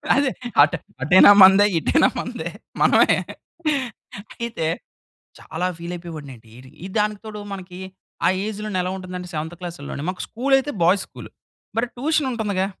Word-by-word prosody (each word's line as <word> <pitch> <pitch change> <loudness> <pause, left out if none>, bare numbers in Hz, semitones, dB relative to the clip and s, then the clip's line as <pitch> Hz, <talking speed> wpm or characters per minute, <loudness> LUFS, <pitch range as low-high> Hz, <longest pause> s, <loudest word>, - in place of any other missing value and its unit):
అదే 280 -1 +2 0.3
ఆటు 165 +4 +4 0.2
అటైనా 185 +8 +7
మందే 195 +2 +8
ఇటైనా - - +3
మందే, - - -5 0.3
మనమే. - - +5 1.3
అయితే, 195 -9 -2 0.7
చాలా 175 +3 -4
ఫీల్ 170 +1 -6
అయిపోయేవాడిని 160 -5 -9
అండి. 115 0 -21
ఇర్ 130 +1 -14 0.2
ఈ - - -4
దానికి 210 -1 0
తోడు 210 -1 -7
మనకి 180 -2 -8 0.5
ఆ - - +6 0.2
ఏజ్‌ 210 -1 -5
లోనే 200 -3 -2
ఎలా 180 - -2
ఉంటుందంటే 180 -1 -7
సెవెంత్ 160 +3 -4
క్లాస్‌లోనే 155 -4 -6
మాకు 185 - -7
స్కూల్ 270 +4 0
అయితే 290 +2 -3
బాయ్స్ 185 +3 +3
స్కూల్, - - -11 0.5
మరి 240 +1 0
ట్యూషన్ 295 +1 0
ఉంటుందిగా. 200 -5 -1
185 Hz, 150 wpm, -22 LUFS, 170-215 Hz, 1.3 s, మందే